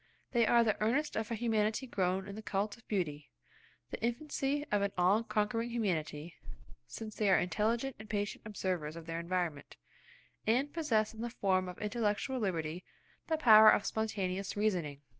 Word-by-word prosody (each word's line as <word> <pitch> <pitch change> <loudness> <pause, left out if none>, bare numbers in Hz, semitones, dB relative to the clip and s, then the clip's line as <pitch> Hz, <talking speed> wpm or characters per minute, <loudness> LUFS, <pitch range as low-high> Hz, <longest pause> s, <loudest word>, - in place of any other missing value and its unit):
They 235 -3 +3
are 235 +1 +5
the 215 -2 0
earnest 270 +8 +1
of 220 0 -2
a 230 - -1
humanity 220 +1 0
grown 190 -4 -1
in 200 - -7
the 215 - -7
cult 205 0 -2
of 235 - -23
beauty–the 150 -8 -6
infancy 280 +4 -1
of 205 -1 +2
an 200 0 0
all 185 +5 +4
conquering 230 +2 -1
humanity, 170 -8 -2 0.5
since 220 -1 -7
they 210 -2 +1
are 190 - +6
intelligent 225 +9 0
and 215 - -11
patient 205 -1 -2
observers 185 -7 -3
of 165 -1 -9
their 165 0 -4
environment, 170 -4 -3 0.7
and 260 +6 +2
possess 230 -11 +1
in 220 - -8
the 240 - -2
form 185 -5 0
of 180 - -8
intellectual 210 +3 -1
liberty 170 -4 -2 0.4
the 320 - +1
power 220 -6 +9
of 205 - +3
spontaneous 195 -3 -2
reasoning. 175 -9 -1
210 Hz, 165 wpm, -33 LUFS, 185-230 Hz, 0.7 s, power